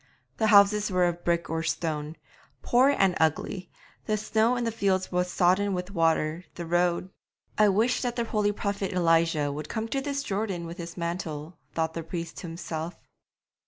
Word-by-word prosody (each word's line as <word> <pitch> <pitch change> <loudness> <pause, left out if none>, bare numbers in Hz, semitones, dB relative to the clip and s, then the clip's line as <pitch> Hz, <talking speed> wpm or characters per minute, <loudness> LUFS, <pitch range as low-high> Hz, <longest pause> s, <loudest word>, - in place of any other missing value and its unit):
The 220 - +2
houses 205 0 +5
were 180 -1 +3
of 175 0 -2
brick 170 -1 +1
or 160 0 -2
stone, 160 -1 -2 0.5
poor 255 +3 +4
and 195 -9 +3
ugly; 165 +3 0 0.4
the 215 - +1
snow 220 +3 +2
in 245 - -1
the 230 - 0
fields 195 -4 0
was 180 0 0
sodden 190 +2 +2
with 180 +2 -4
water; 165 -1 +1
the 170 - -5
road 175 +2 +1 0.5
'I 210 -1 +6
wish 220 +6 +2
that 245 -2 -2
the 235 - 0
holy 210 -2 +1
prophet 200 -1 -3
Elijah 165 -4 +2
would 150 +1 -6
come 225 0 -2
to 275 - -1
this 280 0 -2
Jordan 195 -6 -2
with 170 +1 -8
his 170 0 -7
mantle,' 170 -2 -4 0.2
thought 160 0 0
the 165 - -4
priest 165 +1 -6
to 175 - -6
himself. 165 0 -5
180 Hz, 180 wpm, -27 LUFS, 165-210 Hz, 0.5 s, I